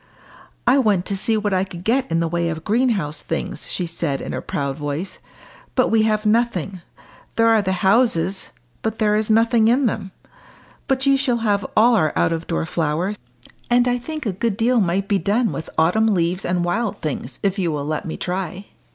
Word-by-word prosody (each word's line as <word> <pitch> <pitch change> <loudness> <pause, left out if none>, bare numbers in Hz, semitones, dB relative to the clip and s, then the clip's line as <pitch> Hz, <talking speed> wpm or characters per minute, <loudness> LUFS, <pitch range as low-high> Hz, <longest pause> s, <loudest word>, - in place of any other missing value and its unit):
"I 255 +3 +5
went 205 -7 +2
to 200 - -1
see 220 +3 +1
what 205 -1 -1
I 185 0 +2
could 175 -2 -8
get 250 +6 +1
in 165 0 +2
the 165 - +1
way 170 0 -1
of 160 -1 -5
greenhouse 210 - 0
things," 165 - -4
she 180 - -1
said 165 -4 -2
in - - -5
a - - -2
sudden - - -8
proud 140 -1 -2
voice. 150 +5 -4 0.6
"But 255 - +3
we 225 -1 +4
have 215 0 +1
nothing. 210 -5 0 0.5
There 230 0 +3
are 225 -1 +5
the 190 -2 -1
houses, 195 -3 +2 0.3
but 220 0 -2
there 210 -1 +2
is 215 0 0
nothing 225 0 +4
in 255 +4 +3
them. 200 -4 -2 0.8
But 265 0 +1
you 275 0 +4
shall 260 -3 +1
have 205 -1 +1
all 235 +3 +6
our 155 -8 +2
out - - +2
of 165 0 -3
door 165 -1 -1
flowers, 165 +5 -1 0.5
and 245 0 +4
I 245 0 +1
think 310 +3 -6
a 205 - -1
good 205 +2 -1
deal 240 +1 +3
might 190 +2 0
be 200 -1 +2
done 220 +4 +1
with 160 - -5
autumn 180 +8 +3
leaves 180 -2 0
and 175 0 0
wild 210 +5 -1
things 145 -3 -4
if 195 0 0
you 175 -3 0
will 145 -2 -3
let 155 +1 -3
me 160 - -5
try." 185 +1 -4
200 Hz, 210 wpm, -21 LUFS, 170-230 Hz, 0.8 s, all